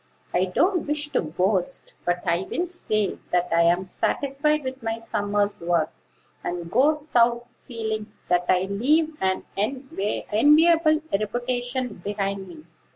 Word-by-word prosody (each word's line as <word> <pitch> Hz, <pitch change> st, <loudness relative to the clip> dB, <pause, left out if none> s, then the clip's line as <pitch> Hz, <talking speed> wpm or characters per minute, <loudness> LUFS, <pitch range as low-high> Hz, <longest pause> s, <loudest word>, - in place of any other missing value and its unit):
"I 180 Hz, +1 st, +3 dB
don't 350 Hz, -, +1 dB
wish 295 Hz, 0 st, -1 dB
to -, -, +1 dB
boast; 185 Hz, +8 st, -1 dB
but 175 Hz, 0 st, 0 dB
I 170 Hz, +3 st, 0 dB
will 350 Hz, -, -1 dB
say 215 Hz, -, -1 dB
that 180 Hz, 0 st, +1 dB
I 170 Hz, -, +5 dB
am 175 Hz, +2 st, +3 dB
satisfied 285 Hz, +9 st, 0 dB
with 260 Hz, 0 st, -5 dB
my 225 Hz, 0 st, -2 dB
summer's 205 Hz, -2 st, -1 dB
work, 170 Hz, 0 st, +1 dB, 0.5 s
and 175 Hz, -1 st, -4 dB
go 275 Hz, +6 st, +4 dB
South 240 Hz, -5 st, +1 dB
feeling 220 Hz, -3 st, -5 dB, 0.2 s
that 180 Hz, 0 st, +2 dB
I 185 Hz, 0 st, +4 dB
leave 295 Hz, +11 st, +1 dB
an 190 Hz, 0 st, 0 dB
enviable 290 Hz, -, +2 dB
reputation 245 Hz, +1 st, -2 dB
behind 200 Hz, -1 st, -3 dB
me." 160 Hz, -3 st, -12 dB
220 Hz, 135 wpm, -24 LUFS, 190-275 Hz, 0.5 s, I